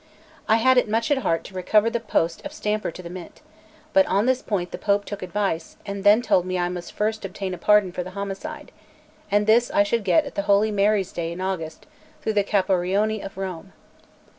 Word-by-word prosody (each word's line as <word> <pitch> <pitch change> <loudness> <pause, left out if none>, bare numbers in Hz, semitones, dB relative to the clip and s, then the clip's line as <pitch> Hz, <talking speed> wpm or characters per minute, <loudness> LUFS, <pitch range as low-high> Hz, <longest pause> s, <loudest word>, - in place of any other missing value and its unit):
I 220 - +6
had 255 +3 +5
it 230 - -2
much 225 +5 0
at 285 - +3
heart 165 -9 0
to - - -12
recover 205 +4 +2
the 235 - -1
post 170 -7 -1
of - - -7
stamper 210 0 -2
to 180 +2 -10
the 170 - -7
Mint; 180 -1 -10 0.5
but 290 - +6
on 205 -5 +2
this 260 0 +2
point 180 -4 -2
the - - -6
Pope 200 0 +1
took 205 -1 -6
advice, 185 -3 -3
and 200 -1 -5
then 210 +3 +5
told 180 - +3
me 185 0 -2
I 175 0 0
must 175 -1 -6
first 215 +1 -1
obtain 195 -1 -4
pardon 210 -1 +4
for 180 - -4
the 180 - -8
homicide, 200 -1 -6 0.6
and 205 +1 +2
this 230 +3 +4
I 200 - +3
should 225 +2 -1
get 295 - +3
at 280 - -8
the - - -1
holy 205 +2 +4
Maries' 200 -1 +1
day 165 -1 -3
in 170 - -7
August 180 -4 -4 0.4
through 220 - 0
the 205 -1 +2
Caporioni 195 +2 +1
of 195 - -8
Rome. 190 -1 -6
200 Hz, 215 wpm, -24 LUFS, 185-215 Hz, 0.6 s, I